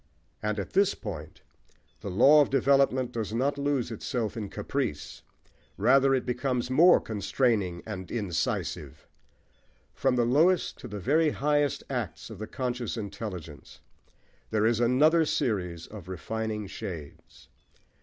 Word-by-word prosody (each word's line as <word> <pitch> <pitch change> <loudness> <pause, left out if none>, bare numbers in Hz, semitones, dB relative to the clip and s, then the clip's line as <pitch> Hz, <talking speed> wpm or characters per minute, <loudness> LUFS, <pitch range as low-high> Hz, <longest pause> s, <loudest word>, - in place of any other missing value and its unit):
And 105 0 -1
at 100 - -5
this 200 +1 +3
point 80 -9 -8 0.6
the - - -6
law 135 +11 +6
of 145 - +2
development 135 -2 +2
does 110 -3 -4
not 140 +4 0
lose 140 -4 0
itself 115 0 -3
in 105 -3 -5
caprice: 120 - -4 0.6
rather 135 +5 +4
it 130 - -2
becomes 125 0 -1
more 170 +7 +6
constraining 105 -4 -1
and 95 -4 -6
incisive. 100 -8 -3 0.9
From 130 -1 +1
the 120 -1 +2
lowest 160 +9 +2
to - - -8
the 105 -2 -6
very 155 - +3
highest 145 -1 0
acts - - -4
of - - -9
the 110 - -5
conscious 125 -3 -3
intelligence, 95 -7 -7 0.7
there 110 -1 +1
is 115 0 +2
another 150 +8 +4
series 95 - -1
of 105 -5 -11
refining 110 +3 -4
shades. 85 -6 -9
120 Hz, 135 wpm, -28 LUFS, 105-135 Hz, 0.9 s, law